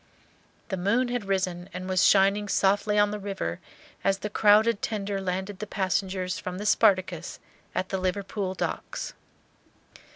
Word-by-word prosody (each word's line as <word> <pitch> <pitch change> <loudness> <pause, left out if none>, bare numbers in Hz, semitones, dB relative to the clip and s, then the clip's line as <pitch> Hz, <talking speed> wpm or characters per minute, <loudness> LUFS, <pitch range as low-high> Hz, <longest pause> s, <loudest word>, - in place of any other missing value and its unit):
The 190 - -2
moon 230 +8 +1
had 245 -4 -2
risen 185 -2 -1
and 185 0 -5
was 185 -1 +2
shining 200 +1 +4
softly 205 +2 +2
on 205 0 +4
the 210 - -4
river 195 - -4 0.4
as 195 0 +2
the 210 +1 -5
crowded 210 +1 +4
tender 200 -2 -2
landed 190 +1 -3
the 215 - -5
passengers 190 -1 -1
from 180 0 -5
the 205 - -5
"Spartacus" 185 -5 +2 0.4
at 185 +1 -1
the 190 - -1
Liverpool 190 +1 -2
docks. - - -4
195 Hz, 150 wpm, -27 LUFS, 185-205 Hz, 0.4 s, shining